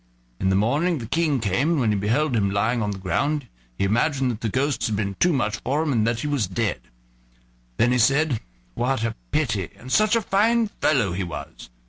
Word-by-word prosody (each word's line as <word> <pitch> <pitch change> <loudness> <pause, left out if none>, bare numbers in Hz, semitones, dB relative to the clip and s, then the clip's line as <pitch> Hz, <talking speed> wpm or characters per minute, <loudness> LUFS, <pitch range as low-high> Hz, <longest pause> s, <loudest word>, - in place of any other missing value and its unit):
In 95 - +1
the 95 - +2
morning 145 - +1
the 120 - -6
King 150 +2 +1
came, 115 - 0
and 160 - +1
when 115 -4 +2
he - - +1
beheld 120 +7 +1
him 100 -3 +2
lying 110 +4 0
on 105 - -1
the 100 - -4
ground 125 - -1 0.3
he - - -1
imagined 125 +3 +1
the 115 - -2
ghosts 130 0 0
had 110 - -1
been 100 -1 -2
too 180 - +4
much 110 -7 0
for 140 +7 -1
him, 155 - -1
and 110 -2 +2
that 115 0 0
he - - -3
was 145 -7 0
dead. 115 -3 -2 1.0
Then 120 - +3
he 125 - +2
said: 135 +2 +3 0.3
"What 125 - -1
a 115 - -1 0.2
pity! - - -1
and 130 - -10
such 215 - +4
a 230 - +2
fine 220 +3 +2
fellow 130 - +1
he 90 +2 -2
was." 75 -8 -8
120 Hz, 215 wpm, -23 LUFS, 105-150 Hz, 1.0 s, too